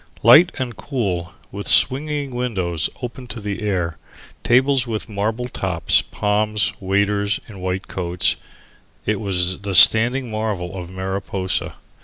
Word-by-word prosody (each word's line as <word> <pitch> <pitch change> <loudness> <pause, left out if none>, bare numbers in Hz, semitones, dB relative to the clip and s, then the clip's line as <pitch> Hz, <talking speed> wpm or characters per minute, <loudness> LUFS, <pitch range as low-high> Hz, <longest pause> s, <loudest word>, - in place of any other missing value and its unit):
Light 155 - +6
and 125 -3 -4
cool, 95 -11 -4 0.2
with 100 +1 -7
swinging 145 0 +4
windows 95 -10 -2
open 125 +1 -7
to 120 - -7
the 105 -1 -5
air, 90 -6 -3 0.4
tables 130 +1 +2
with 110 -2 -4
marble 110 +4 -3
tops, - - +1
palms, 105 -2 -1
waiters 100 +1 -1
in 100 -4 -12
white 95 +1 -4
coats 90 -1 -1 0.7
it 105 -1 -1
was 95 -3 -2
the 100 -1 -4
standing 120 +6 +7
marvel 105 -4 -4
of 90 -2 -7
Mariposa. 95 0 -3
105 Hz, 130 wpm, -20 LUFS, 95-120 Hz, 0.7 s, standing